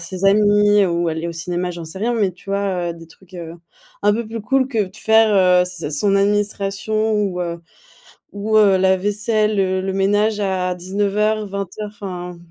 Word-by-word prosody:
ses 190 0 -6
amis, 205 0 +4
ou, 170 -1 0
aller 160 +1 -3
au - - -5
cinéma, 175 +2 -3
j'en 170 -1 -7
sais 160 +4 -7
rien 235 +3 0
mais, 205 -5 +1
tu 180 +2 -20
vois, 195 -3 -1
heu, - - -12
des 165 0 -13
trucs, 185 +3 -20
heu, 165 -2 -7 0.5
un 205 0 +4
peu 230 +1 -3
plus 225 +1 -6
cool 260 +5 +1
que 225 -6 0
de 190 +3 -13
faire, 220 -1 +3
heu, 180 -1 +4
ses 180 0 -7
a - - -4
son 195 +7 +1
administration 205 +1 0
ou, 200 -4 -1
heu, 170 -1 -4 0.7
ou, 215 +2 0
heu, 200 -3 +5
la 190 0 +3
vaisselle, 210 +2 0
le 190 -1 0
le 190 0 -3
ménage 205 +2 +1
à 185 -2 -1
19:00 205 +3 -1
20:00 200 +1 -5
enfin, 180 -4 -7
195 Hz, 195 wpm, -19 LUFS, 180-210 Hz, 0.7 s, heu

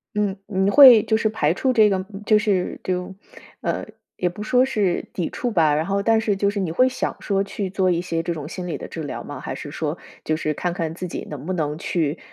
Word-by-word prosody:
嗯， 205 -2 0
你 190 -1 +1
会 250 -4 +9
就 220 - +1
是 220 -1 +1
排 165 -8 +1
除 260 +8 0
这 220 -4 +5
个， 190 -1 0 0.2
就 215 0 +5
是 200 -4 -1
就， 180 0 -3 0.5
呃， - - -2 0.3
也 180 - 0
不 175 +4 -5
说 250 +4 +3
是 210 -9 0
抵 175 - -2
触 245 - -3
吧， 160 -7 +3
然 155 +2 0
后 200 +1 0
但 225 +2 +3
是 220 -2 0
就 200 +1 +1
是 205 0 -3
你 185 -4 -1
会 255 +10 +3
想 255 - -3
说 195 -1 0
去 200 -1 -4
做 185 -1 +1
一 170 -1 0
些 165 -2 -2
这 170 - -2
种 150 -3 -6
心 180 0 -6
理 170 - -3
的 - - -7
治 160 - -6
疗 145 - -5
吗？ - - -8
还 - - -5
是 - - -7
说， - - -3 0.3
就 155 - +1
是 155 -1 -2
看 175 +3 -2
看 165 -3 -3
自 180 +1 -5
己 - - -6
能 150 -1 -7
不 185 - -2
能 150 -4 -2
去， 160 -2 -1
185 Hz, 270 characters per minute, -22 LUFS, 170-210 Hz, 0.5 s, 会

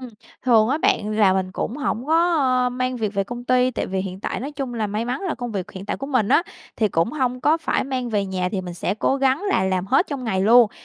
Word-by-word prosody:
Ừm, 255 - -8 0.3
thường 225 -3 +4
á 285 +5 +1
bạn 210 -8 +1
là 210 -3 +4
mình 190 -1 -1
cũng 235 - -3
hổng 250 -3 -2
có, 330 +2 +3 0.3
a, - - +2
mang 255 0 -2
việc 215 -3 -3
về 195 - 0
công 240 +3 -7
ty, 255 0 +3
tại - - -3
vì 190 0 -3
hiện 190 0 -6
tại - - -3
nói 280 +4 -5
chung 270 -4 -5
là 220 -2 -1
may 210 +3 -2
mắn 250 +2 -3
là 380 -4 -2
công 245 -2 -5
việc 190 -3 -4
hiện 190 +1 -9
tại - - -2
của 275 - -6
mình 255 -7 +1
á - - +4 0.3
thì 215 - +2
cũng 170 - 0
hông 255 -4 -1
có 305 +4 +3
phải 330 - -1
mang 255 -2 -3
về 205 -3 0
nhà, 185 -1 -2
thì 195 - -1
mình 180 -1 -7
sẽ 180 - -2
cố 265 - +1
gắng 270 +4 +1
là 190 - +2
làm 185 0 -1
hết 270 - +3
trong 275 -4 -4
ngày 190 -5 0
luôn, 230 +1 +6
240 Hz, 280 wpm, -22 LUFS, 200-260 Hz, 0.3 s, luôn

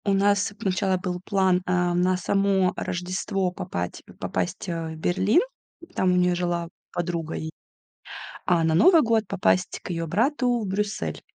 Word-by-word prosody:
У 200 - +2
нас 200 +1 +2
сначала 190 0 0
был 180 0 -4
план, 190 -2 +2
а, 180 -1 +1
на 180 +1 +2
само 195 0 +2
Рождество 185 +1 -2
попать 90 - -5 0.2
попасть, 190 +3 -3
а, 165 -2 -3
в 160 - -7
Берлин, 190 - +2 0.5
там 185 -1 +2
у - - +2
неё 180 0 +3
жила 175 -1 -2 0.2
подруга, 170 -2 -3
и, 160 0 -4 0.9
а 175 -2 +3
на 160 0 +2
Новый 325 - +6
год 225 -4 +1
попасть 185 -2 0
к - - -9
её 165 -1 -2
брату 250 - +1
в - - -3
Брюссель. 200 +2 -2
185 Hz, 160 wpm, -25 LUFS, 175-200 Hz, 0.9 s, Новый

